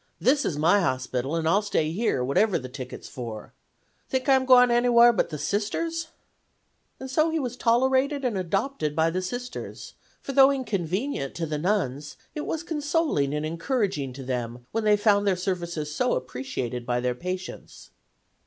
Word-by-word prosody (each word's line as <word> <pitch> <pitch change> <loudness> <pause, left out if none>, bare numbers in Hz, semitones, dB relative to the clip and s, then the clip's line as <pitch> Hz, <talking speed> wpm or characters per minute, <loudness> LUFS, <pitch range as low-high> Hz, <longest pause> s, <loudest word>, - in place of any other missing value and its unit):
This 280 +3 +3
is 145 - -1
my 175 +7 +4
hospital, 130 -1 -1
and 165 -1 -1
I'll 195 +6 +4
stay 160 -7 0
here, 180 - 0
wherever 180 +10 +2
the 130 - -6
ticket's 130 0 -8
for. 115 -4 -7 0.6
Think 260 0 -1
I'm 265 -1 +4
gwine 250 -1 +7
t'anywhar 240 0 +5
but - - +1
the 150 - -5
Sisters'?' 325 - -2 0.9
"And 265 - -6
so 310 +5 +2
he 325 - -1
was 250 -5 -3
tolerated 260 +4 +2
and 240 -4 0
adopted 190 - -1
by 160 +1 +2
the 185 +2 -1
Sisters, 245 +7 -6 0.3
for - - -6
though 270 0 +7
inconvenient 200 - -2
to 170 - -2
the 150 -1 -3
nuns 150 -6 -1 0.2
it 300 - -5
was 325 0 -2
consoling 295 - 0
and 150 +1 -2
encouraging 165 - -1
to 135 +1 -8
them 120 -1 -4
when 225 0 -1
they 210 -1 +5
found 205 -1 +3
their 195 - +3
services 170 -5 -3
so 250 +10 +1
appreciated 125 -1 -4
by 120 0 -1
their 125 0 0
patients. 180 +7 -7
190 Hz, 170 wpm, -26 LUFS, -, 0.9 s, gwine